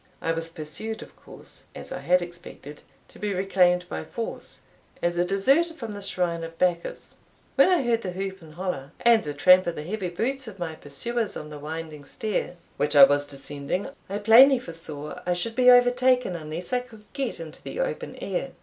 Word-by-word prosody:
I 165 - -1
was 165 0 -3
pursued, 165 +8 -6
of - - -16
course, - - -13
as - - -9
I - - -4
had 180 0 +3
expected, 170 -4 -10 0.3
to - - -16
be 205 -2 -2
reclaimed 180 -2 +2
by - - -5
force, 230 -1 -6 0.4
as 175 0 0
a 175 - +2
deserter 270 - +2
from 230 -8 -6
the 205 -1 -7
shrine 180 -4 -2
of 165 0 -8
Bacchus. 175 -1 -1 0.4
When - - +5
I 355 -6 +3
heard 235 -2 +1
the 190 - -4
whoop 190 +1 -5
and 155 -2 -14
hollo, 175 -7 -4
and 235 -2 +5
the 145 -1 -5
tramp 185 +5 +6
of 170 - -1
the 150 - -5
heavy 185 +2 -3
boots 255 +9 -2
of 205 -3 -9
my 170 -3 -4
pursuers 210 - -3
on 150 - -8
the 150 - -8
winding 155 0 -6
stair 210 -4 -3 0.2
which 150 +1 0
I 140 - +10
was 145 +1 +5
descending, 140 +5 -4 0.2
I 200 - -2
plainly 235 +6 +7
foresaw 165 -7 -6
I 180 - +3
should 200 +6 -3
be 250 -1 +6
overtaken 250 -3 +4
unless 165 +6 -6
I 250 - +3
could 230 -4 -13
get 270 -9 -3
into 160 -1 -9
the - - -7
open - - -3
air. - - -4
180 Hz, 200 wpm, -26 LUFS, 165-230 Hz, 0.4 s, I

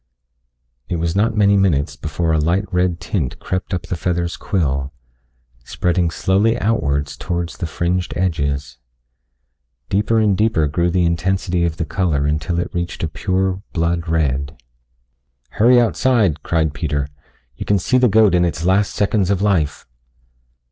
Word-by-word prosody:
It - - -1
was 85 +1 -1
not 110 +2 +1
many 100 -1 +4
minutes 75 -7 +1
before 80 +1 -2
a 80 - +2
light 85 +6 +1
red 90 -1 +1
tint 80 - -3
crept 95 0 -4
up 90 -2 -2
the - - -4
feather's 85 0 -2
quill, 70 -7 -1 0.7
spreading 90 +5 0
slowly 100 +7 +1
outwards 75 -11 0
towards 85 -1 -4
the 85 - -2
fringed 85 +3 -2
edges. 70 -7 -2 1.1
Deeper 105 +3 +1
and 105 -3 +3
deeper 105 -6 +2
grew 85 +4 0
the 90 0 +1
intensity 90 +1 0
of 85 -1 -2
the 85 - -2
color 80 -6 0
until 75 +3 -1
it 85 - -3
reached 85 -1 -3
a - - +1
pure 95 +4 -1
blood 85 0 -1
red. 70 -3 -1 0.9
"Hurry 120 +3 +4
outside," 110 - +2
cried 80 -3 0
Peter. 70 -2 -2 0.5
"You - - -6
can 100 - +3
see 125 +8 +1
the 125 -1 +4
goat 105 -2 +4
in 90 -1 +3
its 85 -1 -2
last 95 +2 +2
seconds 100 -2 +1
of 100 -2 +1
life." 85 -9 0
85 Hz, 155 wpm, -19 LUFS, 80-95 Hz, 1.1 s, many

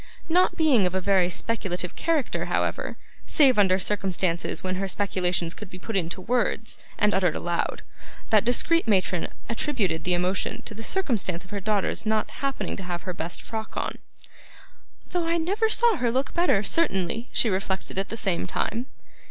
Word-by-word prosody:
Not 360 +3 +3
being 275 - +4
of 180 - -4
a - - +2
very 185 -1 +3
speculative 180 -3 -2
character, 315 -5 0
however, - - -1 0.3
save 265 -7 +5
under 190 -2 +5
circumstances 190 -3 0
when 185 0 -1
her 195 +1 -1
speculations 180 -3 0
could 210 0 -9
be 185 - -9
put 220 +4 -6
into 175 0 -1
words 235 0 0 0.2
and 210 -1 +3
uttered 180 -4 +2
aloud, 175 0 -2 0.5
that 215 -2 +5
discreet 250 +6 +3
matron 185 -4 +2 0.2
attributed 220 - -1
the 180 0 +2
emotion 180 +2 -1
to - - -8
the 220 - -8
circumstance 220 - -1
of 185 - -17
her 205 - -2
daughter's 205 0 0
not 215 0 0
happening 275 -1 -2
to 195 - -6
have 175 -1 -4
her 185 - -3
best 170 0 -4
frock 220 -1 -6
on: - - -2 1.1
'though 350 -2 0
I 335 +1 +2
never 400 +7 +1
saw 460 -2 +3
her 240 -4 +1
look 265 +3 -1
better, 340 - +3
certainly,' 225 - 0
she 225 - +2
reflected 190 0 -2
at 195 - -2
the 225 - -6
same 190 -6 -1
time. 240 +3 -2
205 Hz, 175 wpm, -26 LUFS, 185-250 Hz, 1.1 s, save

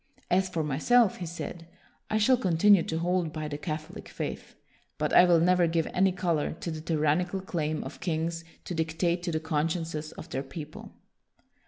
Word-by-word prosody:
" - - -30
As 190 +1 +3
for 165 -3 -1
myself," 190 - +3
he 175 - -5
said, 170 0 -7 0.2
" - - -37
I 215 - +1
shall 220 +5 +5
continue 195 -3 +4
to 160 - -3
hold 175 -1 0
by 155 -1 -4
the 145 -1 -5
Catholic 155 0 -6
faith; - - -6 0.4
but - - -1
I 180 - +8
will 175 -2 +5
never 180 +1 +4
give 165 -1 +1
any 190 +1 +3
color 175 -5 -1
to 170 +1 -5
the 155 -1 -5
tyrannical 165 +4 0
claim 155 -5 -2
of - - -9
kings 165 -1 -2 0.2
to - - -4
dictate 165 +2 0
to 175 -1 -3
the 160 - 0
consciences 160 0 -2
of - - -9
their 135 - -2
people." 150 +3 -9
165 Hz, 190 wpm, -28 LUFS, 155-180 Hz, 0.4 s, I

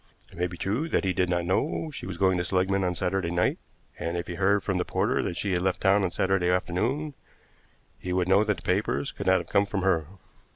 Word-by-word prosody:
It - - -15
may 90 - +1
be 90 -1 -9
true 115 - -1
that - - +1
he 95 - +1
did 90 -1 +1
not 85 -1 0
know 150 - -1
she 120 - -6
was 95 -3 -6
going 95 -1 +2
to - - 0
Seligmann 95 +2 +1
on 90 -1 0
Saturday 90 0 -1
night, 85 +1 +1 0.4
and 85 +1 -2
if 85 - -3
he 85 - -6
heard 100 +3 +2
from 95 -2 -1
the - - +1
porter - - 0
that 85 - -3
she 100 - -1
had 90 -1 +1
left 95 0 0
town 100 +1 +3
on 95 - +1
Saturday 95 0 +1
afternoon 110 - 0 0.9
he 90 - -5
would 90 0 +1
know 95 +3 +5
that 105 -1 0
the - - -12
papers 95 +3 0
could - - -6
not - - +5
have - - -4
come 100 0 +3
from 100 -2 -2
her. 85 -6 +2
95 Hz, 250 wpm, -27 LUFS, 90-100 Hz, 0.9 s, know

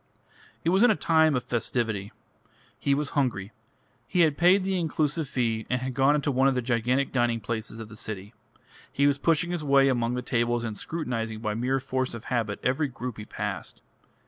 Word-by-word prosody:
It 165 - +2
was 190 +3 +3
in 245 - +7
a 215 - +4
time 160 -4 +3
of 125 - -1
festivity. 110 -3 -2 0.7
He 140 - +2
was 145 0 -1
hungry; 115 -8 -1 0.6
he 180 - +2
had 155 -3 +4
paid 180 +5 +4
the 190 -1 0
inclusive 155 -1 -1
fee 115 -4 -1
and 125 - +1
had 130 +1 -4
gone 135 +3 +4
into 145 -1 0
one 135 +1 +3
of 135 - +2
the 125 - +1
gigantic 125 +3 +1
dining 120 -2 +1
places 110 +1 -5
of 110 - -7
the 105 - -12
city; 105 -1 -7 0.6
he 140 - +1
was 140 0 +3
pushing 165 +3 +1
his 175 -3 -2
way 140 -1 +4
among 120 -1 0
the 125 - -3
tables 120 0 0
and 110 -2 -3
scrutinising 115 -7 -3
by 105 -2 -1
mere 125 +4 0
force 130 -1 -2
of 115 - -8
habit 110 -4 -1
every 135 +4 +1
group 125 -2 -6
he 105 - -7
passed. - - -5
125 Hz, 200 wpm, -27 LUFS, 115-145 Hz, 0.7 s, in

